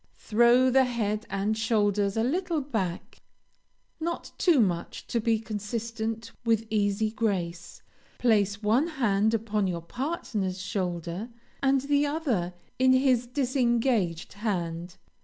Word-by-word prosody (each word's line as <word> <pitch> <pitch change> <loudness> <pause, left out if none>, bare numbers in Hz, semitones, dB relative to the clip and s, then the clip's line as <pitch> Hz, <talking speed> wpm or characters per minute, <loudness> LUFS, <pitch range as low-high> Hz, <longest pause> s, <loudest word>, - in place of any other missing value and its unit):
Throw 240 +3 +4
the 265 +1 +5
head 220 -3 -2
and 200 +2 0
shoulders 205 -2 +1
a 225 - +2
little 335 +5 0
back, 220 -11 -4 0.8
not 340 +1 -4
too 340 -7 +4
much 180 -6 -1
to 235 - -1
be 225 0 +2
consistent 225 +1 -4
with 225 -1 +2
easy 210 0 +1
grace, 185 -7 -3 0.3
place 205 -3 +2
one 235 +9 +3
hand 220 -8 +1
upon 215 -2 0
your 170 -2 -3
partner's 215 - -3
shoulder, 180 +2 -3 0.3
and 270 -1 +3
the 285 +1 +2
other 245 - -1 0.2
in 260 0 +5
his 255 -2 +3
disengaged 240 - 0
hand. 175 -4 -3
220 Hz, 120 wpm, -27 LUFS, 200-255 Hz, 0.8 s, the